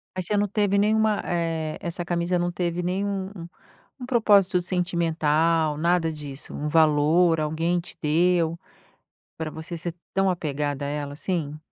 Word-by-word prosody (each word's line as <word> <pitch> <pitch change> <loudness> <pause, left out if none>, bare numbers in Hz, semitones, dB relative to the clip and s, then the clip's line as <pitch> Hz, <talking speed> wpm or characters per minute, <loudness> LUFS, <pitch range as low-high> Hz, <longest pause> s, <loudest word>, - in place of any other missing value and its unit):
Aí 185 - -2
você 205 +4 -1
não 205 0 +2
teve 205 0 +1
nenhuma, 215 +1 +2
eh, 165 -3 -2
essa 175 +1 -4
camisa 175 +1 0
não 175 0 -1
teve 175 0 -2
nenhum, 190 +1 -2 0.7
um - - -5
propósito 205 -7 +4
sentimental, 165 -3 +1
nada 170 0 +2
disso, 145 -2 -8
um 150 - -3
valor, 160 +2 +4
alguém 165 +3 0
te 170 - -13
deu 165 +1 +2 0.8
para 160 -1 -4
você 160 +2 -7
ser 170 0 -5 0.2
tão 195 0 +3
apegada 145 -4 -2
a - - -3
ela 145 -1 -4
assim? 155 -2 -3
170 Hz, 150 wpm, -25 LUFS, 155-180 Hz, 0.8 s, propósito